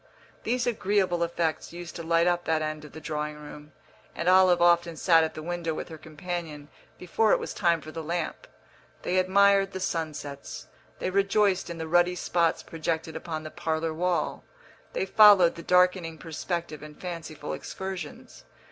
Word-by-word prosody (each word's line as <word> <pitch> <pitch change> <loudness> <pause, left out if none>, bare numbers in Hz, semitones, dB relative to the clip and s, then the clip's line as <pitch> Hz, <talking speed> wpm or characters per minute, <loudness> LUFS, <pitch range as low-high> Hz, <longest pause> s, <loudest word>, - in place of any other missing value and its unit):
These 245 +2 0
agreeable 195 -6 +1
effects 170 -1 -1
used 175 -1 -8
to 170 - -5
light 165 +1 +2
up 175 0 +1
that 160 -1 +1
end 155 0 -4
of 150 - -12
the - - -8
drawing 150 -1 -4
room, 150 0 -11 0.4
and 170 - -3
Olive 185 -1 +6
often 170 -1 +3
sat 165 -3 +5
at 160 - -3
the 155 - -7
window 170 -1 -3
with - - -6
her 160 - -8
companion 155 -1 -6 0.3
before 205 +4 +1
it - - +3
was - - -5
time 170 -4 +1
for 155 - -9
the 165 - -6
lamp. 165 +1 -4 0.6
They 185 +1 +1
admired 195 +1 +4
the 190 - -4
sunsets, 155 -5 -5 0.3
they 185 - -3
rejoiced 195 -1 +2
in 170 - -6
the 160 -1 -5
ruddy 175 +2 +3
spots 170 -1 0
projected 160 0 -3
upon 160 -3 -5
the 155 - -8
parlour 160 0 -2
wall, 175 +2 -1 0.5
they - - -1
followed 205 - +7
the 170 - -9
darkening 180 -2 +2
perspective 165 -1 -5
in 150 0 -10
fanciful 165 -4 -6
excursions. 190 -5 -7
170 Hz, 170 wpm, -27 LUFS, 160-180 Hz, 0.6 s, followed